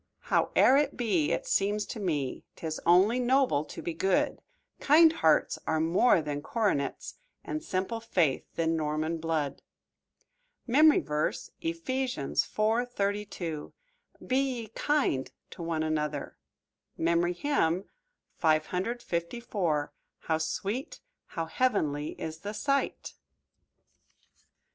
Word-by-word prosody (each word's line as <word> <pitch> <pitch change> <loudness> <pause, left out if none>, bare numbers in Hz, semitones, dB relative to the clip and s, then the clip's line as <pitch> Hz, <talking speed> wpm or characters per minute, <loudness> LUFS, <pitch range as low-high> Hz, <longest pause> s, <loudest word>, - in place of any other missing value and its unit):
"Howe'er 265 - +4
it 290 -1 +1
be, 195 -11 +1
it - - -1
seems 205 +1 +1
to 225 - -7
me 150 -9 -2
'Tis 160 -1 -5
only 190 +8 +5
noble 250 - +2
to - - -9
be 170 - -3
good; 185 +3 +1 0.4
Kind 320 +2 +6
hearts 160 - +2
are 160 0 +1
more 165 +3 +3
than 145 -1 -3
coronets, 195 - -2 0.2
And 310 - -4
simple 190 +5 -2
faith 175 - +1
than 165 0 +1
Norman 155 +1 -1
blood." 155 -4 -2 1.0
MEMORY 295 +5 +5
VERSE, 150 0 -2
Ephesians 165 - -1
4: 220 +3 +1
32 200 -8 -3 0.5
"Be 260 - +1
ye 255 -5 -2
kind 255 - 0 0.2
to 180 - -9
one 165 -1 -1
another." 150 -2 -2 0.6
MEMORY 170 +1 +1
HYMN 185 - +1 0.6
_"How 170 -1 -1
sweet, 200 - -3 0.3
how 165 - -4
heavenly 160 - -1
is 160 0 -5
the 205 +4 -5
sight!" 275 +3 -1
175 Hz, 110 wpm, -29 LUFS, 160-235 Hz, 1.0 s, Kind